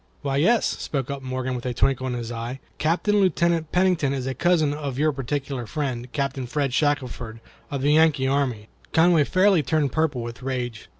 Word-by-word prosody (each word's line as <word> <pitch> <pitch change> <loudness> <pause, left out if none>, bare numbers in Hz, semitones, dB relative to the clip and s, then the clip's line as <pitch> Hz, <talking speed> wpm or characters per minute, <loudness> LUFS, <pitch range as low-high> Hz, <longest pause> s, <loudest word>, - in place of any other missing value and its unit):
"Why, 135 -1 0
yes," 220 +10 +3
spoke 135 -2 -3
up 140 -1 -5
Morgan, 130 0 -3
with 125 -1 -4
a 125 - -3
twinkle 130 0 +1
in 125 - -2
his 120 -1 -5
eye, 120 +3 -5 0.2
"Captain, 180 +7 +1
Lieutenant 170 -4 +1
Pennington 180 -7 +2
is 130 -2 -3
a 135 - -2
cousin 155 0 +2
of 145 -4 -4
your 155 +2 +2
particular 135 -2 -4
friend, 125 -3 -3
Captain 135 -3 -2
Fred 140 0 -1
Shackelford, 125 -6 -1 0.3
of 140 -2 -3
the 145 +1 +4
Yankee 155 -4 +4
army." 130 -6 0 0.3
Conway 160 -2 +5
fairly 185 0 +4
turned 145 0 0
purple 150 -6 0
with 115 +2 -7
rage. 125 -4 -4
140 Hz, 185 wpm, -24 LUFS, 125-155 Hz, 0.3 s, Conway